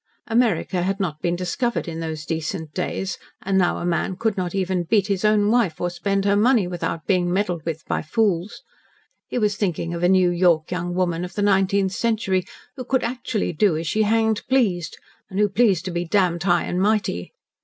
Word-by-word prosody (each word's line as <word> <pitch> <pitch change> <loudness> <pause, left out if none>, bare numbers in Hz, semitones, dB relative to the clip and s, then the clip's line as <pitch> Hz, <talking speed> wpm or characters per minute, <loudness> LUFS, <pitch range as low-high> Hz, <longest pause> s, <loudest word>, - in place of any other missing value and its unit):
America 225 -5 +1
had 195 +2 -1
not 160 -6 -3
been 175 -1 0
discovered 190 +6 -2
in 165 -1 -5
those 160 -1 -5
decent 160 -1 -4
days, 185 +1 -3 0.2
and 195 0 -1
now 185 -2 +2
a - - -4
man 175 +2 0
could 220 -1 0
not 180 -2 -3
beat - - -2
even 185 -2 -1
his 200 -3 +1
own 210 0 +3
wife, 225 -10 +1
or 175 0 -1
spend 195 +2 -1
her 200 0 +3
money, 225 0 +4
without 175 -2 -4
being 180 -2 +1
meddled 180 -4 -1
with 160 -1 -4
by - - -1
fools. 195 +1 -1 0.6
He - - -4
was 210 -3 +1
thinking 175 -4 -2
of 170 - -4
a 175 - +3
New 185 -2 +4
York 175 -3 +2
young 175 0 -3
woman 175 -2 0
of 180 +1 -7
the 205 - 0
nineteenth 195 -1 +2
century 195 -4 0 0.3
who 255 - -6
could 260 +1 0
actually 235 -5 -2
do 170 0 +2
as 165 - -4
she 215 +7 0
hanged 220 0 +2
pleased, 190 - +1 0.3
and 190 - -6
who 210 - +4
pleased 195 -4 +2
to 185 - -3
be 170 0 -2
damned 175 -1 +1
high 175 -1 +2
and 180 - -2
mighty. 205 - 0
185 Hz, 205 wpm, -22 LUFS, 175-210 Hz, 0.6 s, money